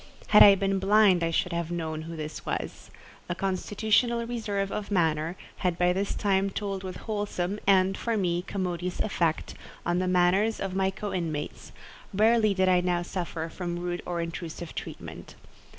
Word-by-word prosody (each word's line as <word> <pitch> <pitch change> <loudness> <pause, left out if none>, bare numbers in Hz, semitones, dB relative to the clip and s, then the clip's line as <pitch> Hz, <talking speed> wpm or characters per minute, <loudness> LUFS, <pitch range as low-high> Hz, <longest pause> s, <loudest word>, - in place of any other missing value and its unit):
Had 210 - +7
I 200 -1 +10
been 195 0 0
blind 195 -2 +4
I 165 - +1
should 180 +2 0
have 170 -1 -2
known 160 -2 -3
who 165 +1 -7
this 155 -1 -6
was. - - -4 0.4
A 175 - -1
constitutional 215 +5 +1
reserve 210 -4 -2
of 210 -1 -4
manner 165 -3 +1 0.2
had 180 -2 -1
by 180 0 +3
this 195 +2 -2
time 195 -1 +1
told 195 -1 -4
with 185 -1 -5
wholesome 205 -2 -2
and, 190 -1 +4
for 230 +1 -1
me, 175 -3 0
commodious 180 -2 -3
effect, 170 -6 0 0.3
on 175 +1 +1
the 185 - 0
manners 185 +5 +3
of 195 -1 -3
my 190 0 +1
co 195 +1 -5
inmates; 160 -5 -4 0.4
rarely 215 0 +4
did 185 0 +2
I 180 -1 +4
now 175 -1 0
suffer 170 -2 -4
from 175 +1 -4
rude 175 0 -3
or 175 -1 -2
intrusive 170 0 -6
treatment. - - -8
185 Hz, 170 wpm, -27 LUFS, 175-200 Hz, 0.4 s, I